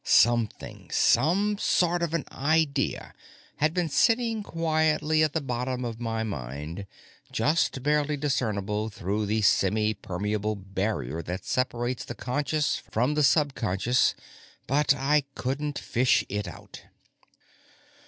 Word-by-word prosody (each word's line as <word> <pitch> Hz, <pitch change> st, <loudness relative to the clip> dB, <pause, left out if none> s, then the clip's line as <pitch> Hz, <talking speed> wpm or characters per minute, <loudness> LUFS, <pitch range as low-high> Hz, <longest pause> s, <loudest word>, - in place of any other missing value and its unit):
Something, 120 Hz, -1 st, +2 dB
some 195 Hz, -, +3 dB
sort 175 Hz, -3 st, +2 dB
of 170 Hz, -1 st, -1 dB
an 160 Hz, -, -2 dB
idea, 145 Hz, -1 st, 0 dB, 0.4 s
had 155 Hz, +1 st, +2 dB
been 175 Hz, 0 st, 0 dB
sitting 225 Hz, -, +2 dB
quietly 155 Hz, -3 st, +1 dB
at 155 Hz, -2 st, +2 dB
the 160 Hz, -, 0 dB
bottom 125 Hz, -1 st, -3 dB
of 115 Hz, -1 st, -5 dB
my 115 Hz, -2 st, -2 dB
mind, 80 Hz, -, -6 dB, 0.4 s
just 150 Hz, -4 st, +1 dB
barely 150 Hz, 0 st, +1 dB
discernible 110 Hz, -7 st, -1 dB
through 100 Hz, +1 st, -2 dB
the 110 Hz, +2 st, +1 dB
semipermeable 105 Hz, +1 st, +1 dB
barrier 95 Hz, -, -3 dB
that 90 Hz, +3 st, -6 dB
separates 125 Hz, -1 st, -1 dB
the 120 Hz, -, -7 dB
conscious 145 Hz, +4 st, -1 dB
from 125 Hz, +7 st, +1 dB
the 150 Hz, -, +1 dB
subconscious, 125 Hz, -, +2 dB, 0.5 s
but 145 Hz, +2 st, +2 dB
I 140 Hz, +1 st, +2 dB
couldn't 140 Hz, +3 st, -2 dB
fish 120 Hz, -3 st, +2 dB
it 105 Hz, -1 st, -3 dB
out. 85 Hz, -, -11 dB
125 Hz, 120 wpm, -27 LUFS, 105-150 Hz, 0.5 s, some